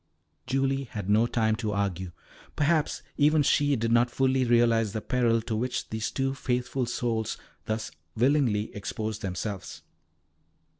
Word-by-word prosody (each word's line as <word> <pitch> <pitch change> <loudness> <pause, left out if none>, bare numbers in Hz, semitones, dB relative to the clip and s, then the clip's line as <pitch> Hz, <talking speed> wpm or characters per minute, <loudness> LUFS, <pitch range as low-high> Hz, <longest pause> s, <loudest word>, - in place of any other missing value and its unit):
Julie 135 +1 0
had 105 -4 -4
no 110 +3 +4
time 110 -2 +1
to 110 -3 -2
argue; 95 -3 -2 0.4
perhaps 150 +1 +1
even 150 +1 +4
she 145 0 +3
did 115 -1 -1
not 120 +1 +4
fully 130 +1 +2
realise 115 -3 +3
the 110 - -1
peril 115 -2 +1
to 110 - -2
which 125 +2 -2
these 110 0 -2
two 135 0 -1
faithful 125 -1 -1
souls 115 -2 -1 0.3
thus 110 0 -3 0.3
willingly 120 -4 +2
exposed 110 +1 -4
themselves. 95 +1 -5
115 Hz, 140 wpm, -27 LUFS, 110-130 Hz, 0.4 s, no